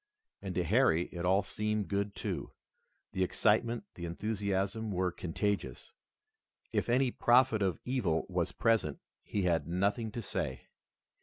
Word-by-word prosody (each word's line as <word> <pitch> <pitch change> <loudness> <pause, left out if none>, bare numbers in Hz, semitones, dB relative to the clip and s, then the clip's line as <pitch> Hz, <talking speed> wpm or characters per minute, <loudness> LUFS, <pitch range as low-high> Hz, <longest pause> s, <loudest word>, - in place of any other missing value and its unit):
And 95 -2 -5
to 90 - +1
Harry 90 -3 +4
it 85 0 -4
all 95 +2 +4
seemed 105 0 -2
good, 100 0 -1
too. - - -4 0.6
The 95 - 0
excitement, 110 +4 +2
the 85 - -6
enthusiasm 100 +3 -1
were 90 -2 0
contagious. 100 +4 -3 0.8
If - - 0
any 125 +1 +3
prophet 120 -3 +4
of 95 -4 +1
evil 100 -11 0
was 90 -2 -1
present 115 -11 +1 0.2
he 100 - -2
had 85 -4 +1
nothing 100 +6 0
to 120 - -4
say. - - -3
100 Hz, 140 wpm, -32 LUFS, 90-110 Hz, 0.8 s, Harry